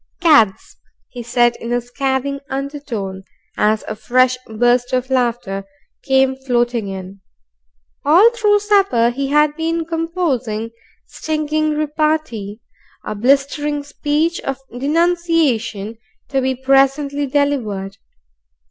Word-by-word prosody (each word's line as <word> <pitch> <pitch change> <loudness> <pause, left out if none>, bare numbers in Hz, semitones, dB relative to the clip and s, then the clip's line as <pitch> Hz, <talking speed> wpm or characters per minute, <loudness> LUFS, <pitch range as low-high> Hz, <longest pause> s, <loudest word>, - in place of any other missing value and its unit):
"Cads!" 290 - +3 0.3
he 245 - -8
said 240 0 +2
in 235 - -6
a 245 - +2
scathing 265 +3 -2
undertone, 265 -9 -5 0.3
as 215 0 +1
a 215 - -4
fresh 255 +4 +2
burst 245 +3 +1
of 255 +1 -1
laughter 240 -6 -1 0.4
came 265 0 +2
floating 240 -4 -1
in. 190 0 -8 0.8
All 360 +11 +6
through 420 -3 +2
supper 390 - +3
he 275 +3 -3
had 300 +1 +3
been 330 +1 -1
composing 315 -10 -2 0.3
stinging 310 0 -2
repartee, 300 -9 -1 0.4
a - - -3
blistering 280 +5 +1
speech 295 +3 -1
of 270 -1 -4 0.2
denunciation 280 - 0 0.3
to 270 -2 0
be 260 0 0
presently 275 +2 +2
delivered. 230 -9 -1
265 Hz, 110 wpm, -18 LUFS, 235-300 Hz, 0.8 s, All